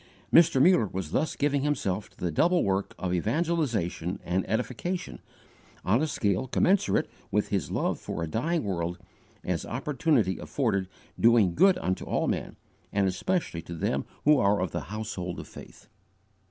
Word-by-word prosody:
Mr. 165 -5 +6
Muller 140 - +5
was 90 -4 -5
thus 155 - 0
giving 145 -1 +1
himself 105 -9 -1
to - - -28
the 90 - -2
double 175 - +3
work 95 0 -1
of 90 -1 -2
evangelization 110 - -1
and 90 +2 0
edification, 125 +10 -3 0.7
on 110 +8 +3
a 160 - +1
scale 105 -3 0
commensurate 190 +9 +2 0.2
with 105 +1 0
his 100 -3 -1
love - - -1
for 85 - -4
a - - -2
dying 155 - -1
world, 85 -3 -2 0.5
as 90 -3 -2
opportunity 130 - 0
afforded 95 -2 -1 0.3
doing 115 -6 +5
good 190 - +5
unto 95 - -2
all - - -1
men, - - -2 0.4
and 100 -1 +2
especially 95 - -1
to 85 +1 -8
them 80 - -1 0.2
who 150 -1 +6
are 100 +1 +3
of 90 -2 -1
the 85 -6 -4
household 100 -4 -4
of - - -8
faith. - - -13
105 Hz, 160 wpm, -28 LUFS, 90-150 Hz, 0.7 s, Mr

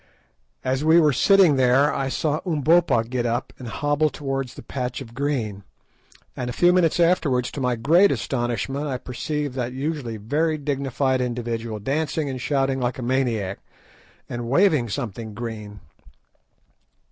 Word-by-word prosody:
As 130 +2 0
we 160 +2 +6
were 150 -3 +4
sitting 185 0 +5
there 130 +3 +4
I 135 -1 -1
saw 150 +2 -1
Umbopa 160 -5 +3
get 120 -1 -1
up 120 +2 -2
and 125 - -7
hobble 145 +5 +1
towards 135 -4 -4
the - - -10
patch 125 -2 -4
of 120 -4 -10
green, 120 -7 -2 0.7
and 125 -1 -4
a - - -4
few 175 +7 +4
minutes 175 -2 +2
afterwards, 165 -8 +2
to 140 - -5
my 125 -1 +1
great 165 - +4
astonishment, 130 +3 -2
I 130 -3 -2
perceived 145 +3 -4
that 125 -1 -2
usually 135 -4 -3
very 155 +9 0
dignified 135 -2 -1
individual 115 -2 -3
dancing 145 +5 -1
and 130 -1 -5
shouting 135 -1 0
like 125 0 -1
a 130 - -5
maniac, 120 -6 -1 0.7
and 120 -1 -5
waving 150 - +3
something 110 0 -5
green. 105 -3 -7
130 Hz, 150 wpm, -23 LUFS, 120-150 Hz, 0.7 s, we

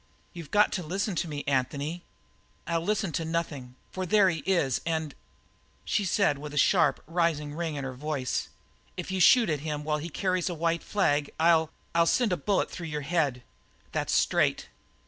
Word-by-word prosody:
"You've 170 -4 -9
got 210 0 +4
to 185 - -2
listen 195 +5 -2
to 170 - -1
me, 145 -2 -5
Anthony 140 +5 -1 0.3
" - - -37
"I'll 170 -1 0
listen 205 0 -1
to 165 - -2
nothing, 160 -6 -3 0.2
for 185 - -4
there 190 0 +4
he 165 - -3
is 170 -10 +1
and 160 -3 -2 0.4
" - - -37 0.3
She 205 - 0
said 185 -6 +2
with 150 0 -7
a - - -4
sharp, - - +3
rising 160 -3 0
ring 165 -1 -3
in 140 - -4
her 130 -1 -4
voice: 135 -1 -3 0.5
"If - - -5
you 190 - -1
shoot 235 +6 +6
at 155 -4 0
him 150 0 -4
while 150 0 -1
he 165 +3 -5
carries 185 +1 -1
that 175 - -2
white 165 +1 0
flag 145 -8 +1
I'll 160 -1 +4 0.2
I'll 170 0 +3
send 230 -2 +2
a - - 0
bullet 195 +7 0
through 170 -2 -6
your 150 -1 -3
head 140 -5 0 0.5
that's - - -2
straight! - - +2
165 Hz, 195 wpm, -28 LUFS, 145-180 Hz, 0.5 s, shoot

